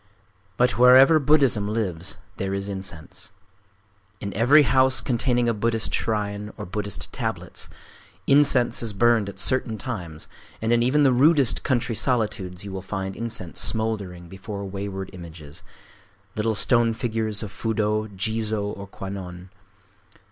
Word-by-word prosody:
But 125 -1 +2
wherever 130 +5 +7
Buddhism 135 -8 +3
lives 95 -6 -3 0.2
there 95 0 -2
is 100 +1 -3
incense. 95 0 -7 0.9
In 100 -1 -5
every 135 +8 +5
house 130 -1 +3
containing 120 -1 0
a 115 - +2
Buddhist 115 +1 0
shrine 105 -1 -2
or 105 - -6
Buddhist 105 +2 -4
tablets, - - -4 0.6
incense 135 -4 +4
is 115 -3 -2
burned 115 -1 +2
at - - -11
certain 130 -4 0
times; 90 -9 -6 0.3
and 115 +1 0
in 120 - +3
even 135 +5 +3
the 135 -2 +4
rudest 140 0 +4
country 120 -2 -1
solitudes 105 -7 0
you 100 - -7
will 95 0 -5
find 95 0 -5
incense 115 -7 -4
smouldering 100 -6 -2
before 100 +2 -7
wayside 95 0 -6
images,—little 95 +6 -8
stone 115 +1 +3
figures 110 -2 -1
of 105 - -7
Fudō, 110 -1 -1
Jizō, 110 0 -2
or 100 0 -9
Kwannon. 95 -2 -8
105 Hz, 135 wpm, -24 LUFS, 95-120 Hz, 0.9 s, wherever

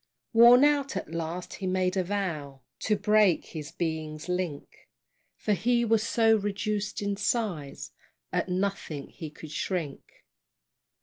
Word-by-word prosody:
Worn 240 +3 +8
out, 285 -6 +2
at 160 - -5
last 165 +2 -4
he 190 - -4
made 185 0 +1
a 190 - +1
vow 165 -8 -3 0.2
To 215 - +1
break 210 -4 +3
his 150 -2 -7
being's 155 -2 -4
link; 180 -5 -4 0.5
For 210 - 0
he 235 +5 +2
was 225 -1 +3
so 225 0 +3
reduced 205 0 -2
in 200 0 -1
size, 205 - -2 0.4
At - - 0
nothing 180 -6 -2
he 160 -4 -8
could 150 0 -11
shrink. 165 -5 -4
190 Hz, 135 wpm, -28 LUFS, 160-215 Hz, 0.5 s, Worn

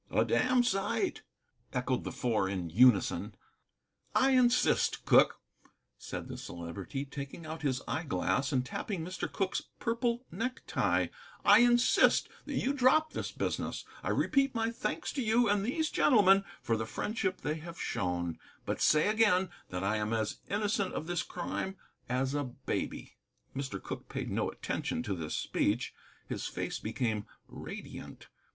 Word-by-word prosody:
"A - - +2
damned 255 -1 +3
sight," 240 - 0 0.5
echoed - - -1
the - - -3
Four 110 -7 0
in 90 -4 -3
unison. 115 +1 +4 0.8
"I 270 +1 +5
insist, 250 -1 +3
Cooke," - - +5 0.6
said - - -6
the - - -6
Celebrity, 90 - -5
taking 140 +3 -7
out 160 +1 -6
his 135 -4 -1
eyeglass 135 0 0
and 130 -2 +1
tapping 165 - -4
Mr. 180 0 -4
Cooke's 195 -1 -1 0.2
purple 235 +1 0
necktie, 240 +8 0 0.4
"I 205 +2 +8
insist 240 0 +5 0.2
that 290 - -3
you 270 +2 +1
drop 285 +4 +4
this - - -3
business. - - -3 0.2
I - - -3
repeat 275 -3 +2
my 225 0 +1
thanks 235 +2 -3
to 275 - -1
you 230 +1 +3
and 205 -1 +2
these 310 +8 0
gentlemen 195 -6 +5 0.2
for 115 - +1
the 110 0 -3
friendship 195 - -2
they 150 +2 -1
have 170 +2 -9
shown, 90 -6 -2 0.3
but - - -2
say 155 +3 +5
again 210 -4 +3 0.2
that 90 +1 -3
I 105 +3 +1
am 105 +1 -1
as 110 -2 -1
innocent 205 -1 0
of - - -3
this 175 0 -1
crime 190 +2 -4 0.3
as 130 +2 0
a 145 0 0
baby." 125 - -4 0.4
Mr. 135 -8 -3
Cooke - - -7
paid - - -4
no - - 0
attention 120 - -3
to 105 -5 -2
this 80 -4 -4
speech. 115 +5 0 0.3
His - - -3
face - - -3
became 110 -4 -2 0.2
radiant. - - -9
175 Hz, 150 wpm, -31 LUFS, -, 0.8 s, I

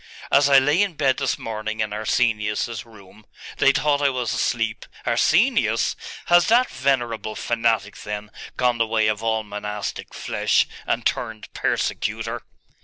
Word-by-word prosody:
As 140 0 +5
I 140 - +7
lay 145 +7 +4
in 200 -5 0
bed 135 -3 +2
this 135 -3 -1
morning 110 0 -5
in 105 -1 -1
Arsenius's 110 0 -1
room 105 -1 -16 0.3
they 140 - +5
thought 145 +1 +1
I 140 - +4
was 125 -3 -2
asleep - - -1
' - - -20
'Arsenius? - - +2 0.3
Has 175 0 +5
that 245 +3 +4
venerable 120 -5 -1
fanatic, 115 -3 0
then, 105 0 -6 0.3
gone 125 -2 +1
the 115 - +2
way 110 -1 +2
of 110 0 0
all 110 -1 0
monastic 105 0 -5
flesh, - - +1 0.2
and - - -1
turned 110 -1 -3
persecutor? - - -2
115 Hz, 150 wpm, -23 LUFS, 110-135 Hz, 0.3 s, I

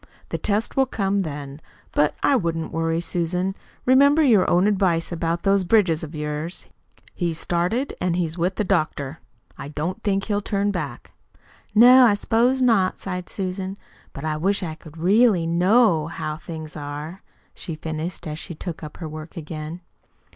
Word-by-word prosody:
The - - -3
test 210 +1 0
will 265 -1 +3
come 200 -4 0
then. 145 -4 -5 0.3
But 150 0 +2
I 280 - +4
wouldn't 165 -7 -1
worry, 165 +1 0
Susan. 180 +2 -1 0.3
Remember 280 +4 +5
your 220 -9 +4
own 180 +2 +4
advice 185 -5 +1
about 170 0 -2
those 195 -1 +3
bridges 175 -5 +3
of 160 0 -7
yours. 150 +3 -4 0.5
He's 170 -3 -2
started, 180 +11 -1
and 180 -2 +1
he's 165 -2 -1
with 180 +2 -1
the - - 0
doctor. 155 -6 -1 0.4
I - - -6
don't 160 +9 -4
think 195 -2 0
he'll 205 -1 -1
turn 200 0 0
back 150 -10 -5 0.6
now." 245 +4 +9
"No, 255 -2 +8
I 205 - +4
s'pose 245 +5 +2
not," 205 -7 +3
sighed 180 -2 -5
Susan. 190 0 -4 0.3
"But 140 - -7
I 155 -1 -1
wish 195 +5 0
I 160 -3 -3
could 155 0 -14
really 195 +1 +4
KNOW 175 0 +3
how 155 -2 -4
things 160 -1 -8
are!" 150 +4 -6 0.3
she 165 - -6
finished, 160 +2 -5
as 155 0 -5
she 170 - -7
took 165 +1 -6
up 155 -2 -9
her 165 - -6
work 155 +2 -9
again. 155 +1 -6
175 Hz, 170 wpm, -23 LUFS, 155-200 Hz, 0.6 s, now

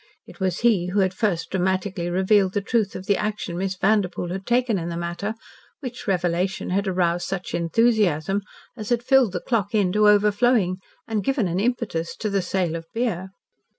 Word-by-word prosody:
It - - -15
was 185 -2 -1
he 215 -7 +3
who 195 +3 +1
had 185 0 +1
first 190 -4 -1
dramatically 185 -1 -1
revealed 190 +1 +3
the 205 - 0
truth 215 0 0
of 185 - -6
the 200 - +3
action 210 -5 -3
Miss 190 +1 -2
Vanderpoel 190 -2 +1
had 190 +2 -5
taken 240 -4 +2
in 170 0 -4
the 170 - -4
matter, 175 +5 -3 0.4
which 250 -4 -7
revelation 180 0 0
had 200 +2 0
aroused 175 -2 0
such 190 -1 -4
enthusiasm 195 -1 +2 0.3
as 215 -3 -7
had 240 -1 +1
filled 260 -4 +4
The 180 - -3
Clock 220 -4 -1
Inn 195 -4 +2
to 210 +2 +4
overflowing 210 -1 +3 0.3
and 215 -3 -1
given 265 -5 +1
an 175 +2 -1
impetus 205 -7 -1
to 215 - -3
the 200 -1 +1
sale 180 -2 -1
of 165 0 -7
beer. 200 -6 -1
195 Hz, 185 wpm, -23 LUFS, 180-215 Hz, 0.4 s, filled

